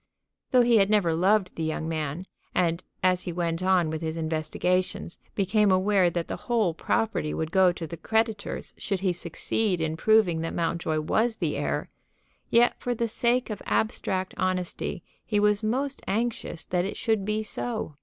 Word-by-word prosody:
Though 250 -1 +5
he 235 -1 +5
had 195 -1 +4
never 200 -6 +3
loved 185 +3 +2
the 165 - -3
young 160 0 -2
man, 160 +2 -3 0.3
and, 170 0 +1 0.2
as 185 -1 +3
he 175 - -2
went 170 0 -2
on 185 -4 +3
with 160 0 -4
his 160 0 -3
investigations, 165 +3 -1 0.2
became 205 +1 +3
aware 185 -1 +3
that 170 -1 -3
the - - -4
whole 225 -8 +2
property 165 -2 -1
would 160 0 -3
go 190 -1 +5
to 170 - -6
the 165 +2 -7
creditors 220 +3 -1
should 195 -3 -2
he 185 -2 +1
succeed 180 +3 -1
in 160 0 -1
proving 185 -3 +3
that 165 - -3
Mountjoy 165 -2 -1
was 220 +8 +1
the - - -1
heir, - - -2 0.6
yet 240 +1 +4
for 245 -1 -2
the 235 +1 0
sake 240 +2 0
of 205 - -5
abstract 190 -3 0
honesty 185 -2 -2 0.2
he 210 -2 0
was 210 0 +3
most 265 +6 -1
anxious 220 -6 -2
that 175 -1 0
it 195 - -4
should 220 -3 0
be 215 +2 -1
so. 215 -7 -4
185 Hz, 175 wpm, -27 LUFS, 165-215 Hz, 0.6 s, Though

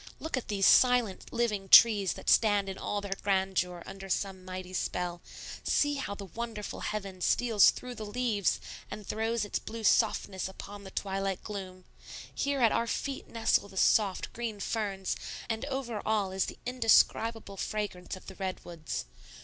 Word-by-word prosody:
Look 320 - -3
at 255 - -4
these 200 -2 +1
silent, 245 -6 +4
living 215 -5 -1
trees 205 -5 +8
that - - -11
stand 205 -3 +4
in 190 - -4
all 205 - -2
their 200 -1 -3
grandeur 190 -3 0
under 195 0 -9
some 190 0 -2
mighty 185 0 -7
spell; 175 -1 -2 0.4
see 290 0 +2
how 205 -7 -4
the 200 - -8
wonderful 220 +2 -6
heaven 195 -3 -4
steals 225 0 +5
through 250 0 -5
the 220 -3 -7
leaves 215 -3 0 0.3
and 210 - -7
throws 225 +1 -1
its 205 - -2
blue 225 0 -7
softness 205 -4 +2
upon 200 +1 -9
the - - -7
twilight 195 -1 -2
gloom; 190 -3 -7 0.5
here 280 -1 -1
at 230 -2 +5
our 235 - +1
feet 275 +4 -3
nestle 225 -3 +1
the 190 - -12
soft, 200 -1 +2
green 230 -3 -4
ferns, 200 -3 -2 0.3
and 225 +3 -2
over 265 -6 -3
all 210 -3 0
is 190 0 0
the - - -7
indescribable 225 -3 +2
fragrance 205 -3 -3
of 185 - -13
the 190 - -9
redwoods. 170 - -5
205 Hz, 165 wpm, -30 LUFS, 190-230 Hz, 0.5 s, trees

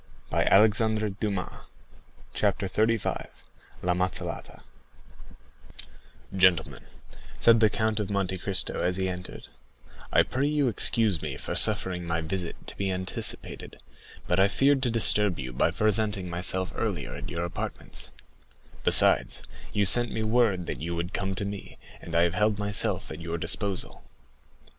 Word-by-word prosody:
20157m 105 -2 +1 0.7
Chapter 95 - 0
35. 110 +3 -1 0.6
La 90 0 +1
Mazzolata 90 +1 -4 1.7
Gentlemen," 90 -2 +2 0.6
said 115 -1 +5
the 110 -1 +4
Count 110 0 -1
of 105 -2 -3
Monte 95 -2 -2
Cristo 95 0 0
as 90 +1 0
he 95 0 0
entered, 90 0 -7 0.6
"I - - +5
pray 135 +3 -1
you 145 -3 +1
excuse 110 -5 +2
me 70 -4 -5
for - - -6
suffering 90 -2 +1
my 85 0 -1
visit 85 +2 -5
to - - -6
be 100 -1 -1
anticipated; 95 0 -2 0.5
but 90 - 0
I 95 - +5
feared 135 +6 +2
to 125 - 0
disturb 105 -3 +2
you 65 -2 -6
by 70 - +2
presenting 105 -1 0
myself 90 +2 -1
earlier - - -3
at - - -7
your 85 0 -3
apartments; 85 - -6 0.7
besides, - - +5 0.3
you 100 -1 +1
sent 120 +5 +5
me 110 - -3
word 110 -5 +1
that - - -5
you 85 +2 -3
would 85 +3 -4
come 95 -1 -2
to 100 - -2
me, 100 0 -7 0.2
and 85 - -7
I 85 - +4
have 85 -1 +1
held 105 +2 +1
myself 100 0 0
at 80 +1 -8
your 85 0 -4
disposal." 100 +2 -2
95 Hz, 145 wpm, -27 LUFS, 90-110 Hz, 1.7 s, said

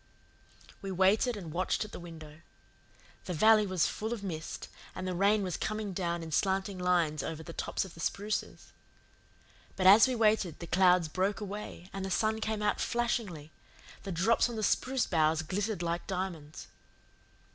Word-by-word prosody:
We 195 - -5
waited 200 +6 +3
and 170 -6 -7
watched 185 +4 0
at 210 - -12
the - - -8
window. 160 -2 -11 0.8
The 180 - -3
valley 215 +4 +5
was 185 -3 +1
full 220 +2 -3
of 220 -4 -6
mist, 160 -5 -5 0.3
and 185 0 -4
the 185 - -1
rain 200 +3 +3
was 180 -3 -2
coming 215 -2 -3
down 170 -2 -2
in 160 - -7
slanting 190 +3 0
lines 170 -5 +1
over 160 +2 -5
the 165 0 -9
tops - - -2
of 190 - -11
the - - -14
spruces. 205 +5 -3 1.0
But 185 - -1
as 205 +6 +9
we 255 - -1
waited 215 -7 +2
the 170 - -7
clouds 180 -1 +4
broke 190 +6 -1
away 205 -3 -7
and 195 0 -4
the 190 - -3
sun 220 +3 0
came 215 -1 -2
out 210 - +1
flashingly; 215 -10 -2 0.5
the 195 - -6
drops 190 +8 +2
on 235 - -5
the 215 - -3
spruce 260 +4 +1
boughs 160 -1 +2
glittered 195 +2 -2
like 170 0 -2
diamonds. 180 -5 -5
190 Hz, 175 wpm, -31 LUFS, 170-210 Hz, 1.0 s, as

